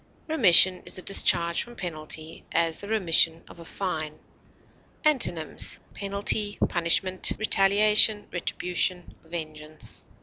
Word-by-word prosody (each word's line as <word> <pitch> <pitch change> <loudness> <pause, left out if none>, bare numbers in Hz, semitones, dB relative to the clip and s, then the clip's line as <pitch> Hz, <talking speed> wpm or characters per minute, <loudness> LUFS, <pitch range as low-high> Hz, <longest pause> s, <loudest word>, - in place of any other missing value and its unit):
Remission 185 - +5
is - - -5
a 185 - -3
discharge 170 -3 +2
from 240 0 -9
penalty; 160 -3 -6
as, 165 -1 -1
the 200 - -9
remission 170 -6 +2
of - - -16
a 170 - -13
fine. 155 -5 -6 0.9
Antonyms: 175 - -1
penalty, 205 +1 -2
punishment, 185 +2 +1
retaliation, 210 +1 +3
retribution, 180 0 -3
vengeance. 155 -2 -6
180 Hz, 105 wpm, -24 LUFS, 165-200 Hz, 0.9 s, Remission